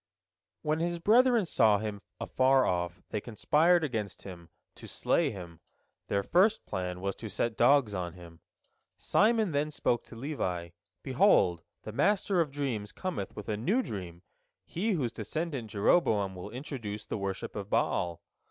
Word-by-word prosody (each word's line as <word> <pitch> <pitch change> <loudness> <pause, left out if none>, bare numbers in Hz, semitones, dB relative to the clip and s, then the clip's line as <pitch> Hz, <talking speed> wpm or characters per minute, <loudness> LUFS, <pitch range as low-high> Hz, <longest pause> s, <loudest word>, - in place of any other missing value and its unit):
When 155 0 0
his 170 +1 -1
brethren 235 +4 +4
saw 110 -10 +4
him 105 -1 -5 0.2
afar 130 0 +3
off, 90 0 -2
they 105 - -2
conspired 160 +10 +3
against 110 -9 -3
him, 85 -3 -10 0.2
to - - -12
slay - - +1
him. 85 -4 -9 0.5
Their 100 0 0
first 200 - +3
plan 90 -1 -4
was 100 0 -2
to 110 - -7
set 110 +3 -1
dogs 120 -2 +4
on 90 -3 -3
him. 85 -2 -13 0.6
Simon 220 -2 +2
then 145 +1 0
spoke 120 -5 0
to - - -12
Levi, 95 - -3 0.3
"Behold, 85 -2 +3 0.2
the 110 - -6
master 195 - +2
of 155 - -1
dreams 130 -8 -3
cometh 185 - -4
with 105 - -8
a 105 - -1
new 200 - +1
dream, 90 - -7 0.4
he 205 +6 -1
whose 130 -10 -1
descendant 135 +1 -4
Jeroboam 100 - +2
will 90 +2 -8
introduce 115 -4 -6
the - - -4
worship 100 -1 -4
of 100 -1 -5
Baal. 85 -1 0
110 Hz, 155 wpm, -30 LUFS, 95-155 Hz, 0.6 s, brethren